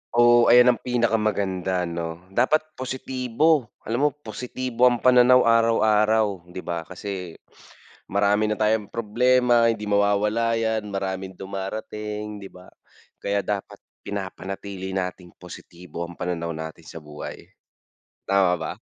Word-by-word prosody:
Oh, 120 0 +6
ayan 125 +1 +7
ang 120 - -4
pinakamaganda 105 -6 0
'no. 85 0 -5
Dapat 155 +9 +1
positibo. 130 +2 0 0.2
Alam 120 +6 +1
mo, - - +2
positibo 125 -1 -1
ang 120 -2 0
pananaw 125 0 +6
araw-araw, 110 -4 +2
hindi 90 +1 -8
ba 85 -2 -4
kasi 90 -2 -6 0.7
marami 100 +2 +1
na 105 0 0
tayong 105 -1 +1
problema, 120 +1 +3
hindi 105 -2 -6
mawawala 105 +3 +2
yan, 110 -2 -2
maraming 95 -1 -3
dumarating, 105 +2 -6
'di 100 -1 -10
ba? 90 0 -15 0.5
Kaya 100 0 -1
dapat 100 0 -4 0.2
pinapanatili 95 -1 -6
nating 90 -2 -4
positibo 85 0 -9
ang 85 - -8
pananaw 85 -1 -2
natin 80 +1 -8
sa 80 - -10
buhay, 75 -1 -9 0.8
tama 95 -2 +3
ba? 80 - -4
105 Hz, 125 wpm, -24 LUFS, 95-115 Hz, 0.8 s, ayan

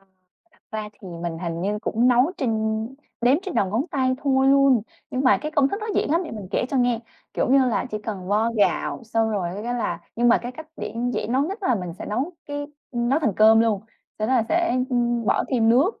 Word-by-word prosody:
Thật 195 - -30 0.7
ra 215 -1 -4
thì, 205 -2 -12
mình 170 -1 -3
hình 170 -1 -4
như 205 +3 -1
cũng 230 +3 +1
nấu 250 +7 +4
trên 260 -6 -1 0.7
đếm 250 +3 +4
trên 380 -3 -5
đầu 200 - +2
ngón 235 - 0
tay 260 -2 +1
thôi 270 -2 +3
luôn. 275 -4 +5 0.3
Nhưng 260 +2 -1
mà 255 - +5
cái 305 - -3
công 280 -3 +3
thức 400 - -4
nó 430 - -4
dễ - - +1
lắm 330 +4 +2
để - - -7
mình 210 -4 -7
kể - - 0
cho 275 - 0
nghe. 245 -2 +2 0.3
Kiểu - - 0
như 275 - +6
là, 230 - 0
chỉ 215 - -3
cần 205 -3 -6
vo 215 +3 +2
gạo 205 - +1
xong 225 0 0
rồi 195 -5 -1
cái 245 +1 -2
là 240 - -2 0.2
nhưng 240 +1 +3
mà 235 - +5
cái 245 +1 -6
cách 315 +5 -10
để - - -6 0.2
dễ - - -2
nấu 255 +4 +1
nhất 380 +8 -3
là 250 - +2
mình 180 -4 -4
sẽ - - -6
nấu 260 +11 -2
cái 290 0 -4 0.2
ừm, 240 -2 -1
nấu 275 +4 +3
thành 275 -10 +1
cơm 220 +1 +7
luôn. 220 -4 +2 0.4
Sau 215 - -1
đó 260 - +3
là 240 - +4
sẽ, 340 -7 +1
ưm, 240 -2 +1
bỏ - - +2
thêm 230 -4 +2
nước. 275 - +3
240 Hz, 250 wpm, -23 LUFS, 215-275 Hz, 0.7 s, cơm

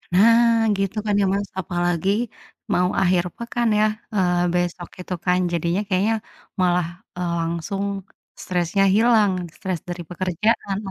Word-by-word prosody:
Nah, 230 +2 +5
gitu 195 +2 -2
kan 205 -1 +1
ya, - - +3
Mas, 200 0 -1
apalagi 175 +1 0 0.6
mau 180 0 +2
akhir 180 -2 +3
pekan 235 0 -1
ya, 215 - +5 0.3
eee, 180 -2 +2
besok 175 0 -2
itu 180 - -5
kan. 180 0 +3
Jadinya 170 +3 0
kayaknya 200 +4 +2 0.4
malah, 180 -2 +2 0.3
eee, 175 -1 -1
langsung 170 +4 -2 0.6
stresnya 180 +2 +1
hilang 220 -2 +4 0.2
stres 185 -3 -3
dari 175 0 -4
pekerjaan. 190 +3 0
185 Hz, 130 wpm, -22 LUFS, 175-205 Hz, 0.6 s, Nah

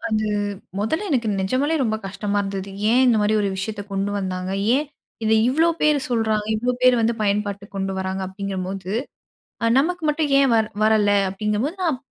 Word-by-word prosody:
அது 215 0 0 0.5
மொதல 315 - -1
எனக்கு 235 -5 +1
நெஜமாலவே 260 +11 +1
ரொம்ப 220 -3 0
கஷ்டமா 200 +1 -2
இருந்தது. 195 0 -5 0.2
"ஏன் 250 +3 +4
இந்த 235 -3 +4
மாரி 210 +1 +2
ஒரு 200 - +1
விஷயத்த 205 +1 -4
கொண்டு 195 +1 -1
வந்தாங்க. 185 -1 -3 0.2
ஏன் 295 +3 +1 0.4
இதை 220 0 +3
இவ்ளோ 320 +6 +3
பேர் 300 -1 +4
சொல்றாங்க. 220 -3 0
இவ்ளோ 245 +3 0
பேர் 255 0 +6
வந்து 230 +1 +2
பயன்பாட்டுக்கு 200 -1 -2
கொண்டு 195 0 -2
வராங்க." 190 0 -3
அப்டிங்கும்போது 190 0 -5 0.7
"அ 230 - +3
நமக்கு 350 +3 -1
மட்டும் 300 -1 0
ஏன் 275 -2 +4
வ - - +5 0.3
வரல" 215 -2 +4 0.2
அப்டிங்கும்போது 210 - -2
நான் 305 -8 0
215 Hz, 170 wpm, -22 LUFS, 195-255 Hz, 0.7 s, பேர்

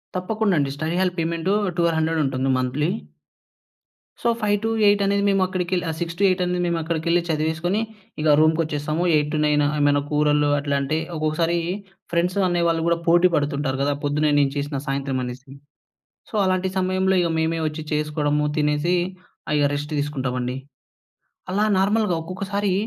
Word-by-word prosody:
తప్పకుండండి. 185 -6 0
Study 155 +4 -2
hall 185 -1 +1
payment 165 +3 0 0.2
1200 165 -2 +1
ఉంటుంది 135 0 -1
monthly 135 +5 0 1.3
so, - - 0
5-8 205 0 +2
అనేది 200 0 +1
మేము 195 -1 +2
అక్కడికెళ్ 185 -1 -1
ఆ - - 0
6-8 180 +3 +1
అనేది 180 0 -1
మేము 170 -1 0
అక్కడికెళ్ళి 170 +1 0
చదివేసుకొని, 160 +5 0 0.4
ఇగ 155 - +1
రూమ్‌కొచ్చేస్తాము. 155 0 +1
8-9 150 0 +2 0.2
ఏమైనా 145 0 +3
కూరలు 150 0 +2
అట్లాంటియి 140 +2 -1
ఒక్కొక్కసారీ 160 +2 0 0.5
ఫ్రెండ్సు 175 +3 +1
అనేవాళ్ళు 170 -2 +1
గూడా 170 0 +2
పోటీ 175 +2 +6
పడుతుంటారు 140 -2 -1
గదా 145 +1 +1
పొద్దునే 150 +1 +1
నేను 140 -1 +2
చేసిన 145 0 -2
సాయంత్రం 135 -1 -1
అనేసి. 130 +2 -8 0.8
సో, 220 - -8
అలాంటి 185 0 +1
సమయంలో 185 0 +1
ఇగ 170 - 0
మేమే 160 +1 0
ఒచ్చి 155 0 -5
చేసుకోడము, 150 -1 0
తినేసీ 150 +4 +1 0.5
ఆహ్, 150 - +1
ఇగ 145 - +3
రెస్టు 145 +1 -4
తీసుకుంటామండి. 130 -3 -2 0.9
అలా 205 +3 +2
నార్మల్‌గా 205 -1 +2
ఒక్కొక్కసారీ 195 +3 -2
160 Hz, 135 wpm, -23 LUFS, 145-180 Hz, 1.3 s, పోటీ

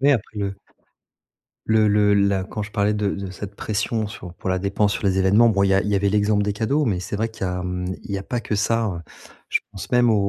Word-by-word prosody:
Oui, 140 +2 +5
après 110 -3 -2
le 100 -1 -2 1.1
le 110 -1 +4
le 105 0 +4
la 100 -1 +2
quand 105 - -6
je 100 - -7
parlais 105 0 +1
de 105 -1 0
de 95 -1 -5
cette 100 +2 -8
pression 110 +1 -1
sur 90 -3 -9
pour 95 - -4
la 95 - +1
dépense 100 +2 +1
sur - - -4
les 95 - +2
événements. 100 +5 +5
Bon 100 -3 +2
il 100 - +3
y 95 - +4
a 95 - +4
il 105 - -2
y 105 - +1
avait 100 0 +2
l'exemple 105 0 +2
des 100 0 0
cadeaux 120 +8 0
mais 100 -8 0
c'est 90 +3 -4
vrai 110 +2 -1
qu'il 105 -3 -4
y - - -1
a, 90 0 -3
mmh, 90 0 -3 0.2
il - - -10
y 100 - 0
a - - -6
pas 120 +4 -3
que 105 - -2
ça 115 +3 +1
hein, 90 -6 -3 0.5
je - - +1
pense 95 - -8
même 125 -1 +4
au - - +4
100 Hz, 280 wpm, -22 LUFS, 95-110 Hz, 1.1 s, Oui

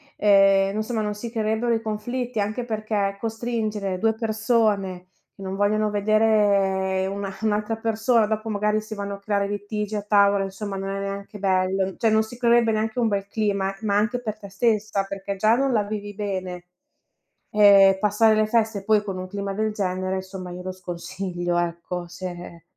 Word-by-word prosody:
ehm, 195 -1 +4
insomma 215 +1 -1
non 210 -1 -2
si 210 +3 -6
creerebbero 220 +1 0
i 225 - 0
conflitti, 230 +2 -3
anche 215 +4 -1
perché, 215 -3 -1
costringere 220 -4 -2
2 225 +3 +2
persone, 215 -4 0 0.3
che - - -14
non 190 0 -4
vogliono 210 +1 +1
vedere 200 -3 +2
una 195 0 -4
un'altra 215 0 0
persona, 225 +1 +2
dopo 220 +1 -2
magari 210 +1 +1
si 215 0 -8
vanno 200 0 -4
a - - -13
creare 200 0 0
litigi 205 +1 -3
a 205 - -4
tavola, 200 -1 +4
insomma 195 +1 -5
non 195 0 -4
è 195 0 -3
neanche 200 +1 -6
bello; 190 0 +1
mhmm, 190 - -7
cioè 225 - +2
non 220 0 +3
si 220 +2 -10
creerebbe 235 -1 +4
neanche 220 +2 -1
un 235 - +3
bel 200 -1 -2
clima, 200 -2 -1
ma 205 -2 +1
anche 230 +4 0
per 215 -3 -5
te 200 -2 -10
stessa, 210 -1 0
perché 195 0 -5
già 215 +4 +3
non 270 +1 +1
la 215 -3 +2
vivi 205 0 -5
bene. 185 -3 -4 0.9
Ehm, 200 -2 +7
passare 210 +2 +4
le 215 0 +3
feste 220 -3 0
poi 215 -1 +3
con 195 -2 -5
un 185 0 -5
clima 200 +1 -4
del 215 +1 -1
genere, 185 -1 -2
somma, 185 -1 -8
io 180 +1 -7
lo 185 - -4
sconsiglio, 175 0 -4
ecco, 175 +1 -3
se 175 -1 -8
205 Hz, 180 wpm, -24 LUFS, 195-220 Hz, 0.9 s, Ehm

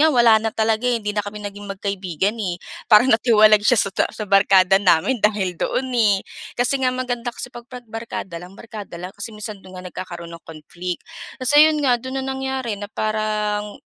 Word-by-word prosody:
nga 315 - +6
wala 235 -5 +5
na 225 - 0
talaga, 220 +2 0
eh, 245 - +2
hindi 210 -2 -3
na 210 - +1
kami 205 +1 -7
naging 205 0 -7
magkaibigan, 195 0 -2
eh. 180 -4 -2 0.3
Parang 220 +4 +7
natiwalag 215 -2 +5
siya 245 - +4
sa 200 - +1
ta - - +1
sa 215 - -6
barkada 195 -1 +5
namin 200 +6 +2
dahil 205 -4 +1
doon, 260 -1 -1
eh. 210 -5 +3 0.3
Kasi 265 +2 +1
nga 255 - +3
maganda 250 -1 -3
kasi 240 - -7
'pag 240 +1 -11
'pag 250 -2 -10
barkada 215 -6 -6
lang, 180 +3 -12
barkada 215 -6 -9
lang 180 +2 -7
kasi 205 +2 -6
minsan 210 -1 -7
do'n 185 0 -12
nga 185 - -9
nagkakaroon 175 -2 -8
ng 165 - -12
conflict. 170 +3 -7 0.4
Tas 255 +3 +1
ayon 305 0 +6
nga, 250 -2 +4
do'n 260 +2 -6
na - - -5
nangyari, 265 -3 -3
na 205 - -6
parang 210 -1 -2
215 Hz, 205 wpm, -21 LUFS, 195-240 Hz, 0.4 s, Parang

